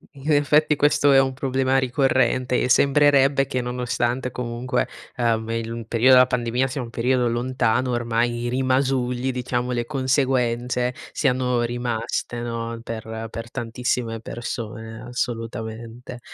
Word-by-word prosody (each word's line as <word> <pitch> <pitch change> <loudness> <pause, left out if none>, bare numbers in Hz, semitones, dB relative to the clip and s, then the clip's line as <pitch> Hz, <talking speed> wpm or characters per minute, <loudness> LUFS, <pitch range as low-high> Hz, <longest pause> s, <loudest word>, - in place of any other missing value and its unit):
In 140 +3 -3
effetti 150 +1 +3
questo 145 0 +3
è 135 - +7
un 135 0 -1
problema 130 0 0
ricorrente 130 -1 +1
e - - +1
sembrerebbe 140 +1 +4
che 130 -2 -1
nonostante 125 +1 -2
comunque, 125 +1 -2 0.3
ehm, 115 -2 0
il 115 0 -3
m 115 - -5
periodo 120 +3 +4
della 125 0 +7
pandemia 125 +1 0
sia 135 +1 -4
un 120 - -6
periodo 125 +1 +1
lontano 125 +1 0
ormai, 120 0 0
i 120 - -1
rimasugli 130 -1 0
diciamo, 125 0 -2
le 120 -1 -1
conseguenze 125 -3 0 0.2
siano 125 -1 +1
rimaste, 120 0 -2
no, 115 -1 -4
per 110 -1 -6
per 115 0 -7
tantissime 115 -1 -2
persone 115 -1 -6
assolutamente. 115 0 -5
125 Hz, 130 wpm, -23 LUFS, 115-130 Hz, 0.3 s, è